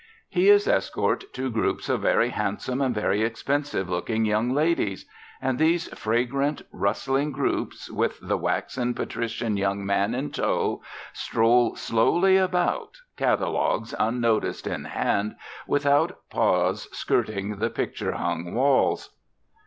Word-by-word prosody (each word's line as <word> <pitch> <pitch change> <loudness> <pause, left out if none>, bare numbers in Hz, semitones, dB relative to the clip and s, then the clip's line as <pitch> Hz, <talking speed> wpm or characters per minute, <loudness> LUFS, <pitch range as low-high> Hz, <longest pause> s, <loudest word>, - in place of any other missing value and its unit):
He 375 +3 +3
is 410 0 +6
escort - - +1
to 130 0 -2
groups 115 - -1
of - - 0
very - - +3
handsome 130 +2 -2
and 130 -3 +1
very 105 0 +1
expensive 120 - -1
looking 110 +5 -1
young 110 +3 +1
ladies; 145 - 0 0.3
and 130 -1 -1
these 165 +2 +2
fragrant, 125 +6 -1
rustling 135 +8 0
groups, 135 0 -2
with - - -1
the - - -1
waxen, 125 -2 -1
patrician 115 -2 -2
young 100 0 -1
man 100 +3 +1
in 135 +3 -3
tow, - - 0 0.3
stroll 115 +1 +2
slowly 175 +12 +3
about, 185 - +1 0.2
catalogues - - 0
unnoticed 115 -1 0
in - - -3
hand, 105 +2 -1 0.3
without 145 +5 +2
pause - - +1
skirting 100 0 -1
the 115 +2 +1
picture - - -3
hung 85 +4 -3
walls. 135 +2 +2
125 Hz, 125 wpm, -25 LUFS, 110-145 Hz, 0.3 s, is